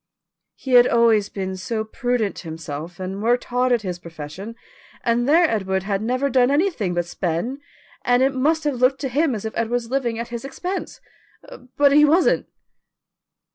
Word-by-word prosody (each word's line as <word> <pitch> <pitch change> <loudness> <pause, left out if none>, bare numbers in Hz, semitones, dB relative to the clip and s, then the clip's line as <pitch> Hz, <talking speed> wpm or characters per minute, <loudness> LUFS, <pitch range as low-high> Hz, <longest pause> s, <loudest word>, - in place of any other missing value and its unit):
"He 265 - -7
had 245 0 +7
always 225 -3 +3
been 190 -1 -4
so 220 +4 -3
prudent 240 -2 -2
himself, 160 +1 -7
and 190 +2 -5
worked 240 +3 +2
hard 250 +1 0
at 235 -3 +2
his 180 -2 -4
profession, 170 +6 -8 0.5
and 240 +2 +1
there 335 +3 +5
Edward 190 -6 -1
had 195 0 -1
never 255 +5 0
done 255 -2 +3
anything 285 - 0
but 175 0 0
spend, 180 - -3 0.4
and 245 +1 +3
it 270 +1 +2
must 305 +5 +1
have 290 -4 -1
looked 260 +1 +3
to 270 - -2
him 285 0 +1
as 210 - -6
if 220 - -4
Edward 230 -1 -1
was 240 -1 -2
living 245 -4 -1
at 235 +1 -5
his 235 -1 -6
expense, 355 +8 -5 0.8
but 285 -1 +5
he 295 +1 +6
wasn't." 320 +5 +3
235 Hz, 175 wpm, -22 LUFS, 195-270 Hz, 0.8 s, had